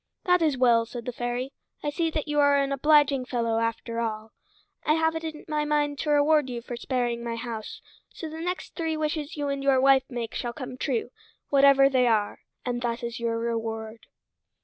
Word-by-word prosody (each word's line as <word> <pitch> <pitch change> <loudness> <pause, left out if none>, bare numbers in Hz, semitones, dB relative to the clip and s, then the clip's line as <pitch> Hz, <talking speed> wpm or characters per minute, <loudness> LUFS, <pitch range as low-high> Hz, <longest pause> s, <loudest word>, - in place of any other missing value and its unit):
"That 360 -2 +3
is 305 -5 +2
well," 235 -2 +4
said 235 0 -7
the 250 - -2
fairy. 245 +3 -3 0.3
"I 295 - -1
see 330 +2 0
that 310 -1 -3
you 295 0 0
are 285 0 +5
an 275 0 +1
obliging 285 -1 +4
fellow, 230 -3 0
after 230 0 -2
all. 220 -1 -3 0.5
I 305 - +3
have 320 0 +1
it 320 - -4
in 315 -2 -6
my 300 -1 0
mind 295 -1 0
to 305 - -2
reward 295 -1 +4
you 240 -1 -5
for 240 - -6
sparing 240 -1 -2
my 235 -1 -3
house, 230 -2 -6 0.3
so 325 - -7
the 320 +1 -7
next 360 +2 -4
three 325 -2 -2
wishes 305 -1 -3
you 290 -1 -1
and 275 0 -2
your 275 -1 +3
wife 270 0 +4
make 240 -3 -4
shall 240 -1 -3
come 255 -1 -7
true, 250 -2 -2 0.4
whatever 275 -1 +6
they 255 -2 +3
are; 215 -3 +1 0.3
and 245 -1 -2
that 235 -1 -2
is 235 0 -4
your 230 -1 -1
reward." 225 -1 -4
260 Hz, 205 wpm, -26 LUFS, 235-295 Hz, 0.5 s, whatever